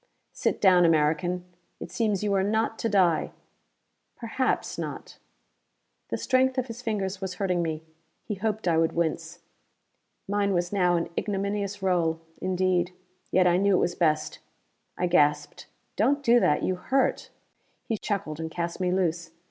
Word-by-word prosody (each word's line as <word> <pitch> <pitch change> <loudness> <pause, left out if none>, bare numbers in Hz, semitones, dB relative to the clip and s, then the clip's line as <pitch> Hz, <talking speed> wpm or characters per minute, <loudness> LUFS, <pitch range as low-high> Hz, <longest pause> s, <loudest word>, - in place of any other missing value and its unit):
"Sit - - -1
down, 185 -3 +5
American! 165 +3 +2 0.3
It - - -8
seems 210 -4 0
you 205 -1 +1
are 195 - +3
not 220 +3 0
to 230 - 0
die. 185 -6 +2 0.8
Perhaps 245 +2 -2
not." - - -7 0.9
The - - -2
strength 260 0 +2
of 255 - 0
his 235 -1 -8
fingers 200 -4 -3
was 190 -1 -4
hurting 180 -3 0
me: 160 -1 -3 0.4
he 215 - -4
hoped 215 0 -2
I 165 -2 +3
would 165 0 +1
wince. 165 -2 -2 0.9
Mine 200 -1 +1
was 175 +2 -1
now 180 -3 +3
an 170 - -1
ignominious 200 0 -2
role, 170 -3 +1 0.2
indeed, 185 -1 0 0.4
yet 185 0 +3
I 175 0 +4
knew 200 +1 +3
it - - +3
was 175 - 0
best. 155 -3 0 0.6
I 180 - 0
gasped. 150 -4 +1 0.3
"Don't 280 +7 +2
do 240 -1 +5
that: 150 - +2
you 185 - 0
hurt!" 265 +8 0 0.6
He 225 - -1
chuckled 160 -7 -3
and 160 0 -4
cast 170 +2 -4
me 180 -1 0
loose. 170 -2 0
185 Hz, 155 wpm, -26 LUFS, 170-205 Hz, 0.9 s, down